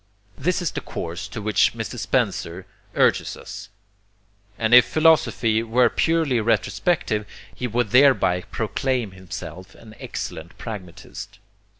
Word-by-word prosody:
This 180 +5 -1
is 170 - -1
the - - -4
course 85 +4 -5
to 105 +1 -7
which 105 -1 +2
Mr. - - -5
Spencer 85 +3 -1 0.3
urges - - +2
us; - - -9 0.9
and 110 +1 +1
if 125 0 +10
philosophy 140 -7 +3
were 115 +1 +3
purely 160 -7 +1
retrospective, 115 0 0 0.3
he 125 - -3
would 120 -2 -1
thereby 125 -9 +5
proclaim 120 0 -1
himself 95 0 -9
an 110 -1 -14
excellent 80 +3 -6
pragmatist. 100 -7 -8
115 Hz, 120 wpm, -23 LUFS, 95-130 Hz, 0.9 s, if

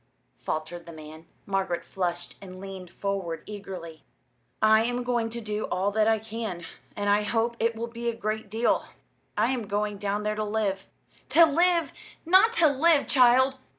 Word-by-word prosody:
faltered 165 +2 -5
the - - -8
man. 155 0 -11 0.2
Margaret 190 -3 -1
flushed 175 -2 -3
and 185 -1 -10
leaned 190 -2 -8
forward 195 -5 -4
eagerly. 185 -6 -8 0.6
"I 220 0 +5
am 245 +1 -1
going 240 -2 0
to 235 +1 -4
do 210 -1 -3
all 190 +3 -1
that 215 +1 +2
I 225 0 +4
can, 215 -5 -5 0.3
and 205 0 -2
I 205 +1 +4
hope 230 +2 0
it 230 0 +1
will 230 +1 -3
be 235 0 -4
a 230 - -3
great 215 -1 -3
deal. 225 +3 +1 0.5
I 225 +4 +2
am 240 -5 -3
going 205 0 -2
down 205 +1 -2
there 210 0 0
to 215 0 -2
live." 205 -2 -2 0.4
"To 335 - +7
live 335 +2 +2 0.3
not 375 +7 +6
to 340 -8 +5
live, 295 +2 +4
child!" 260 +1 +4
215 Hz, 175 wpm, -27 LUFS, 195-235 Hz, 0.6 s, To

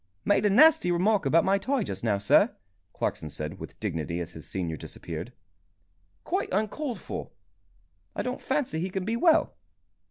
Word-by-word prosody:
"Made 205 +1 +3
a - - +3
nasty 305 - +6
remark 190 0 +2
about 165 +5 +4
my 195 +1 +3
tie 260 +3 0
just 95 - -6
now, 105 -4 +2
sir," 100 0 +4 0.4
Clarkson 80 - -3
said, 75 +5 -6
with - - -10
dignity, 85 -4 -3
as 85 - -5
his 80 - -11
senior 85 -4 -3
disappeared. 85 - -7 0.9
"Quite - - -1
uncalled 220 +4 -2
for. - - -6 0.9
I - - -2
don't 250 +1 -4
fancy 265 - -1
he 180 +3 -2
can 190 0 -3
be 225 +2 0
well." 315 +6 +3
180 Hz, 165 wpm, -27 LUFS, -, 0.9 s, nasty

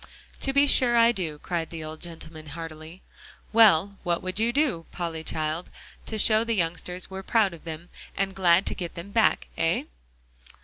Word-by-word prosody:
"To 270 - +1
be 280 +1 +4
sure 245 -4 +4
I 230 0 +6
do," 170 -9 -3
cried 165 +1 -3
the 165 -2 -6
old 155 0 -8
gentleman 160 -2 -8
heartily. 160 +2 -9 0.5
"Well, 200 -3 +5
what 175 -2 -1
would 185 +2 -2
you 230 +2 +2
do, 250 - 0
Polly 165 -2 -4
child, 155 +2 -3 0.4
to 220 - -3
show 215 +1 +4
the 230 0 -1
youngsters 180 +1 -2
we're 190 0 -5
proud 205 -1 +2
of 170 - -13
them, 165 +1 -7 0.3
and 195 0 0
glad 185 -1 +4
to - - 0
get 175 -2 -6
them 175 +4 -8
back 65 - +2
hey?" - - 0
175 Hz, 180 wpm, -26 LUFS, 165-215 Hz, 0.5 s, I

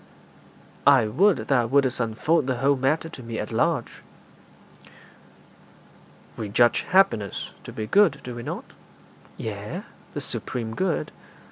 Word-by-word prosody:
'I 130 -6 +6
would 195 - +4
thou 125 -4 +2
wouldst 130 0 +2
unfold 125 +6 +1
the 130 -2 0
whole 140 +3 +3
matter 140 +5 0
to 150 - -10
me 115 -2 -6
at - - -4
large.' - - 0 2.4
'We 110 -2 -4
judge 120 +3 +4
happiness 150 - +2
to - - -7
be 110 - -4
good, 205 - +4
do 125 - -6
we 120 - -6
not?' - - -5 0.7
'Yea, 105 -1 -5 0.3
the - - -2
supreme 115 -3 -4
good.' 185 -2 -1
125 Hz, 130 wpm, -25 LUFS, 115-145 Hz, 2.4 s, I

